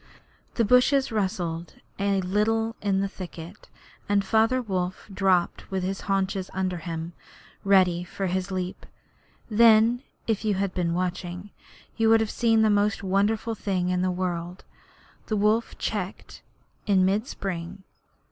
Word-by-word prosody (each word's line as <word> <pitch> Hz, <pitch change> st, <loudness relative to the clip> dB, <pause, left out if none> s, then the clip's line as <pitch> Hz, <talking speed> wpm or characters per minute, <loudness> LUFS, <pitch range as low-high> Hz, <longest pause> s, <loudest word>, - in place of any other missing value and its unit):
The 230 Hz, -, +2 dB
bushes 250 Hz, +4 st, +4 dB
rustled 180 Hz, -5 st, -2 dB, 0.2 s
a 200 Hz, -1 st, +1 dB
little 225 Hz, +4 st, 0 dB
in 195 Hz, -2 st, +1 dB
the 200 Hz, -, 0 dB
thicket, 180 Hz, -1 st, -10 dB, 0.4 s
and 200 Hz, -1 st, +2 dB
Father 225 Hz, +5 st, +3 dB
Wolf 185 Hz, -5 st, -3 dB
dropped 190 Hz, -3 st, +1 dB
with 190 Hz, -1 st, -2 dB
his 190 Hz, +1 st, -3 dB
haunches 195 Hz, -1 st, -1 dB
under 185 Hz, -1 st, -1 dB
him, 165 Hz, 0 st, -5 dB, 0.5 s
ready 185 Hz, -3 st, +4 dB
for 195 Hz, +2 st, -5 dB
his 185 Hz, +1 st, -1 dB
leap. 185 Hz, -1 st, -4 dB, 0.6 s
Then, 230 Hz, +1 st, +5 dB, 0.2 s
if 225 Hz, -1 st, -1 dB
you 210 Hz, -2 st, +1 dB
had 195 Hz, -1 st, -1 dB
been 170 Hz, -2 st, -1 dB
watching, 180 Hz, +1 st, -4 dB, 0.5 s
you 225 Hz, -1 st, +3 dB
would 225 Hz, 0 st, +6 dB
have 220 Hz, -1 st, -1 dB
seen 225 Hz, -2 st, +3 dB
the 215 Hz, -, +4 dB
most 205 Hz, 0 st, +1 dB
wonderful 205 Hz, +4 st, +1 dB
thing 190 Hz, -4 st, -1 dB
in 180 Hz, 0 st, 0 dB
the 185 Hz, -, +1 dB
world 180 Hz, 0 st, -3 dB, 0.6 s
the 215 Hz, -, 0 dB
wolf 215 Hz, +3 st, +1 dB
checked 200 Hz, -2 st, -4 dB, 0.5 s
in 190 Hz, -2 st, +4 dB
mid 205 Hz, +6 st, +1 dB
spring. 190 Hz, -2 st, -5 dB
195 Hz, 145 wpm, -26 LUFS, 180-215 Hz, 0.6 s, would